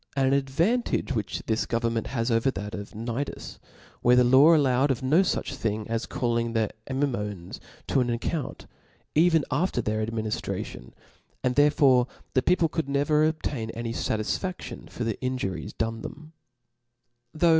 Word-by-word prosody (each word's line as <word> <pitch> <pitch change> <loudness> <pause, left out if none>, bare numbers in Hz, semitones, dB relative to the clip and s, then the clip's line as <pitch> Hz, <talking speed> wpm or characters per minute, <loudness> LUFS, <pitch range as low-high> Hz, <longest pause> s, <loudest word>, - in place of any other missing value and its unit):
An 135 0 +3
ad* 140 -1 +1
vantage 200 - +1
which 110 -5 -3
this 110 0 0
government 115 -1 -1
has 120 -2 -1
over 115 +4 +3
that 105 -4 -5
of 100 0 -6
Cnidusj 115 +5 -5 0.4
where 125 +1 +5
the 125 - +6
law 135 +7 +7
allowed 135 -2 +3
of 130 -1 -1
no 150 +8 +4
fuch 190 - -1
thing 110 -1 -2
as 115 +1 -2
calling 115 -1 -1
the 110 -2 +1 0.2
Amymones 105 -10 -2 0.2
* - - -11
on 125 -3 +3
an 120 - +1
account, 145 +5 -4 0.5
even 160 -1 +4
after 155 0 +1
their 110 -1 -1
adminiftration 110 - -3
^^; - - -17 0.5
and 125 - +2
therefore 140 -3 +4 0.3
the 130 - +3
people. 175 +2 +3
could 160 -2 -2
nev^r 150 +2 +3
obtain 145 -7 -4
iny 115 0 -3
fatisfadion 115 - -3
for 120 - -5
the 115 -2 -3
injuries 100 - -3
* - - -44
done 115 0 -2
them. 155 +2 -9
125 Hz, 160 wpm, -26 LUFS, 115-145 Hz, 0.5 s, law